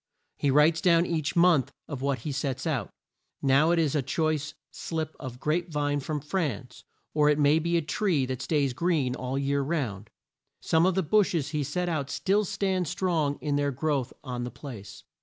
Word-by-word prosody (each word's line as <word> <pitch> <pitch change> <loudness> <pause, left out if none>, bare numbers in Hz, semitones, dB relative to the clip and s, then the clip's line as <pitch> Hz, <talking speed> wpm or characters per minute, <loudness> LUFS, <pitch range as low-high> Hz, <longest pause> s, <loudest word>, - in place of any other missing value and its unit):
He 145 - 0
writes 150 +4 +4
down 170 -2 +4
each 160 -4 -2
month 170 -6 +4 0.2
of 140 -4 -6
what 140 -1 -1
he 150 - -4
sets 140 0 -3
out; 140 -10 -1 0.5
now 140 +4 +4
it 170 - +3
is 155 -4 +2
a 150 - +2
choice 150 +2 -1 0.2
slip 160 -1 -4
of 125 -3 -7
grape 165 +5 -1
vine 145 -2 0
from 150 +1 -3
France; 150 -5 -3 0.3
or 150 -1 +4
it 150 - +3
may 150 +1 +4
be 170 +1 +1
a 165 - 0
tree 155 -2 +1
that 130 0 -4
stays 140 -5 +1
green 145 -3 +1
all 125 +1 -4
the 140 - -1
year 140 +1 +1
round. 130 - -3 0.5
Some 165 +2 +3
of 185 - +1
the 190 - +1
bushes 170 -4 +2
he 150 -1 -1
set 175 +6 -2
out 150 -5 -2
still 200 +7 +1
stand 185 -2 -1
strong 170 -5 0
in 145 -1 0
their 145 0 +1
growth 140 -2 -1
on 125 -3 -4
the 120 - -3
place. 110 -6 -10
150 Hz, 195 wpm, -27 LUFS, 135-165 Hz, 0.5 s, writes